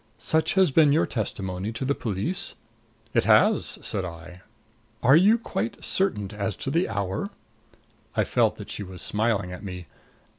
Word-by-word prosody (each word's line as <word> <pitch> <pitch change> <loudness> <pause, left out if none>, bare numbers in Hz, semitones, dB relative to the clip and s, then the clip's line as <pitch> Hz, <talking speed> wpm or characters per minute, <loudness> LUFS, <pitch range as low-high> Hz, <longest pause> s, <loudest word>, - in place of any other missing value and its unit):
Such 160 +2 +1
has 190 -5 +4
been 150 0 +5
your 155 - +3
testimony 95 -3 -3
to 120 +4 -4
the 140 - +2
police?" 110 - -3 0.6
"It - - +2
has," - - +4
said 95 - 0
I. 90 +1 -9 0.6
"Are 130 +4 +7
you 200 +7 +6
quite 115 - -4
certain 105 - 0
as 105 0 -2
to 135 - -4
the 170 +5 +1
hour?" 100 -1 -2 0.9
I - - +3
felt - - +2
that - - -9
she - - -4
was 95 -2 -6
smiling 105 -4 0
at 90 - -8
me. 90 -3 -6
105 Hz, 160 wpm, -25 LUFS, 95-150 Hz, 0.9 s, Are